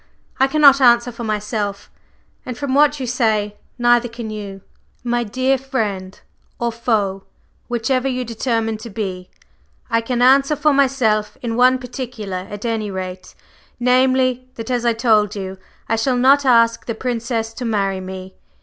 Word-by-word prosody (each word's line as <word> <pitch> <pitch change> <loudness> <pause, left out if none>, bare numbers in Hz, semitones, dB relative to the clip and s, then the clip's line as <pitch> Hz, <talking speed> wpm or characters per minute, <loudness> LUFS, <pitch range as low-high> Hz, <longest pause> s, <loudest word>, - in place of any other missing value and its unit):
"I 265 - +5
cannot 280 -1 +5
answer 240 -1 +5
for 235 0 -8
myself 210 -2 -3 0.5
and 250 -2 -6
from 280 -1 -3
what 295 +1 +4
you 260 - -3
say, 220 -4 0 0.2
neither 240 0 +3
can 230 -1 -7
you." 200 -2 -7 0.4
"My 240 0 0
dear 255 +4 0
friend 205 -8 -3 0.4
or 235 0 -1
foe 210 -5 -1 0.4
whichever 250 +2 0
you 255 -1 -2
determine 225 -1 -1
to 230 +2 -9
be, 190 -4 -5 0.6
I 230 0 +2
can 245 +1 -1
answer 275 +3 +5
for 295 +1 +2
myself 250 -6 +1
in 230 -1 -2
one 255 +2 +4
particular 235 -7 -6
at 205 +2 -7
any 225 -2 -2
rate, 185 -1 -7 0.4
namely, 255 0 +2
that 230 +2 -6
as 245 -1 -1
I 235 - +3
told 220 -3 +2
you, 190 -1 -6 0.3
I 225 - 0
shall 250 +3 +1
not 275 +3 +4
ask 230 -2 +3
the 230 - -2
Princess 230 -2 -3
to 245 - -7
marry 200 -4 0
me. 185 0 -8
235 Hz, 160 wpm, -19 LUFS, 210-255 Hz, 0.6 s, I